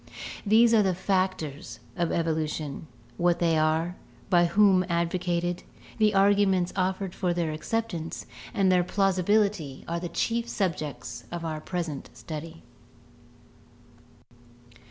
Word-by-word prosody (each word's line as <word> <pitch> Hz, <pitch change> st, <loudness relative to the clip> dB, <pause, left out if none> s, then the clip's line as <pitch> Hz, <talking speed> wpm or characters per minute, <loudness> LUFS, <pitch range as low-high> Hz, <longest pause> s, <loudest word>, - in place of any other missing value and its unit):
These 225 Hz, +3 st, +6 dB
are 220 Hz, -, +6 dB
the 190 Hz, -3 st, +1 dB
factors 185 Hz, -6 st, -2 dB, 0.2 s
of 170 Hz, -3 st, 0 dB
evolution; 155 Hz, -2 st, -2 dB, 0.3 s
what 175 Hz, 0 st, +3 dB
they 165 Hz, -2 st, +2 dB
are, 160 Hz, +3 st, +1 dB, 0.3 s
by 175 Hz, -1 st, +5 dB
whom 195 Hz, 0 st, +4 dB
advocated, 175 Hz, +1 st, 0 dB, 0.4 s
the 215 Hz, -1 st, +3 dB
arguments 195 Hz, -2 st, +3 dB
offered 190 Hz, 0 st, -1 dB
for 180 Hz, -3 st, -1 dB
their 170 Hz, -3 st, 0 dB
acceptance, 170 Hz, 0 st, -3 dB, 0.3 s
and 190 Hz, -2 st, +2 dB
their 180 Hz, -1 st, +4 dB
plausibility 195 Hz, -5 st, +1 dB
are 170 Hz, +1 st, -2 dB
the 175 Hz, 0 st, -5 dB
chief 235 Hz, +5 st, -1 dB
subjects 155 Hz, -, -3 dB
of 170 Hz, -1 st, -4 dB
our 155 Hz, -1 st, -3 dB
present 165 Hz, -5 st, -4 dB
study. 160 Hz, +1 st, -8 dB
175 Hz, 115 wpm, -27 LUFS, 165-195 Hz, 0.4 s, These